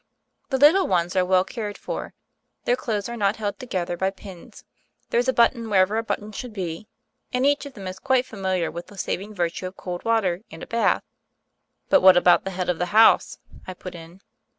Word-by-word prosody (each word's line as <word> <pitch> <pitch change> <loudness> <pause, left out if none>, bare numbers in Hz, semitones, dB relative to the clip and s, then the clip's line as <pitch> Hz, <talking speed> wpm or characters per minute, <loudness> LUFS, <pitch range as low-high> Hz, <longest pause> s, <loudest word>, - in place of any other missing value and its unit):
The 265 - +1
little 305 +8 +5
ones 175 -1 0
are 185 - +3
well 185 0 +3
cared 210 -1 -6
for: - - -6 0.5
their 245 - +3
clothes 215 -5 -3
are 235 - -5
not 205 -2 +1
held 205 -2 -4
together 185 -9 -3
by 190 +2 0
pins: 190 -2 -12 0.5
there's 240 +2 +2
a - - +4
button 235 -2 +2
wherever 195 +1 +3
a - - -3
button 215 -1 -4
should 230 +3 -7
be; 185 0 -5 0.4
and 250 +1 +1
each 285 0 +2
of 280 - -12
them 195 -3 -9
is 185 +1 -7
quite 260 -2 +2
familiar 190 -7 -2
with 170 +2 -8
the 205 - -15
saving 200 +3 -4
virtue 175 0 -2
of 185 - -11
cold 180 -1 -6
water 200 -6 +1
and 165 - -10
a - - -5
bath." 230 0 +1 0.9
"But 285 - +5
what 185 -1 +8
about 175 +1 +4
the - - -2
head 180 - -2
of 180 -2 -1
the 180 - 0
house?" 225 - +5 0.3
I 185 - -6
put 185 - -9
in. 170 +2 -12
195 Hz, 210 wpm, -24 LUFS, 180-230 Hz, 0.9 s, what